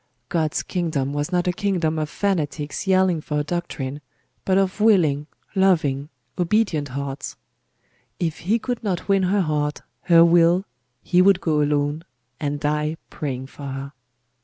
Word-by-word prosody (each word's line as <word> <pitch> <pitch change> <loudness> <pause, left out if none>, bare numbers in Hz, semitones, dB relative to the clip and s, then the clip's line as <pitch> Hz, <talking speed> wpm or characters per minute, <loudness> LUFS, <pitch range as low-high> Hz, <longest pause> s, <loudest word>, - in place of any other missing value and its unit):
God's 160 -3 0
kingdom 155 -7 -2
was 145 +4 -2
not 180 0 +1
a 180 - +2
kingdom 175 -5 0
of 155 -1 -2
fanatics 155 -4 -2
yelling 185 -3 +3
for 150 0 -3
a - - 0
doctrine, 150 -4 -4 0.4
but 190 0 +3
of 195 +1 0
willing, 160 -10 +3 0.3
loving, 155 -8 +2 0.3
obedient 180 -5 +1
hearts. 140 +1 -5 0.8
If 165 -3 -2
he 210 +7 +1
could 245 +1 -4
not 190 -5 -2
win 195 -1 +3
her 190 +2 +2
heart, 150 -3 -1 0.2
her 170 -1 +7
will, 170 +2 +4 0.4
he 180 - +3
would 195 0 +5
go 155 -4 +1
alone, 145 +1 0 0.4
and 145 -1 -2
die 150 +2 -1
praying 130 -3 -4
for 140 +1 -9
her. 135 +1 -6
160 Hz, 150 wpm, -23 LUFS, 145-185 Hz, 0.8 s, her